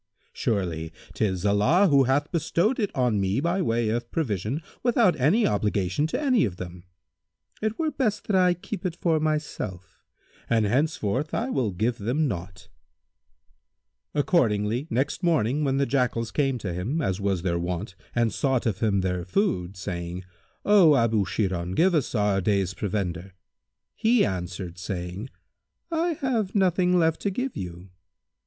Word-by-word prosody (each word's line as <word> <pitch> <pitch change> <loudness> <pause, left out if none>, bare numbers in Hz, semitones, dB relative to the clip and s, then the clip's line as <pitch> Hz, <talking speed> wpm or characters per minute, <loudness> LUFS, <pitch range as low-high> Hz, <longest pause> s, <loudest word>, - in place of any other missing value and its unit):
Surely, 85 -6 -2 0.2
'tis 95 -3 -1
Allah 125 - +4
who 140 -4 +5
hath 145 +4 +1
bestowed 170 - +1
it 205 -3 +1
on 120 -6 +1
me 95 +5 +1
by 170 +5 0
way 115 -7 +1
of 120 +1 -2
provision 120 - -2 0.2
without 235 -6 +3
any 185 - +3
obligation 105 - 0
to - - -2
any 260 -6 +3
of 95 -6 -1
them. 90 0 -8 0.8
It 220 +1 -1
were 315 -2 0
best 245 -7 -1
that 205 - 0
I 180 -1 +4
keep 185 +2 -7
it 180 -3 -2
for 165 -2 +1
myself, 150 - -3 0.5
and 115 -2 +3
henceforth 130 +2 0
I 245 +4 -1
will 125 - 0
give 110 +6 -1
them 130 +9 0
naught." 90 -4 -6 1.5
Accordingly, 120 - +1
next 135 +4 -1
morning 150 - +1
when 135 -1 +1
the 140 - +2
Jackals 120 -3 0
came 135 -3 +1
to 95 -6 -4
him, 105 - -2
as 95 - -1
was 95 -3 0
their 85 -2 0
wont, 90 +3 -3 0.2
and 115 -3 +2
sought 130 -1 0
of 110 -4 -1
him 105 -4 +2
their 90 -1 -1
food, 95 - -1
saying, 90 -1 -5 0.4
"O 190 -8 +6
Abu 115 -5 +2
Sirhбn,[FN#156] 90 -4 -2
give 180 +2 +4
us 150 -6 0
our 105 -2 +2
day's 95 -1 +1
provender,[FN#157]" 95 -2 -3 0.6
he 230 0 +3
answered 90 -1 -4
saying, 95 +3 -5 0.6
"I 335 +1 +1
have 225 -8 -1
nothing 180 -2 +3
left 160 -2 +2
to 200 - 0
give 250 +6 -3
you." 90 0 -7
120 Hz, 155 wpm, -26 LUFS, -, 1.5 s, O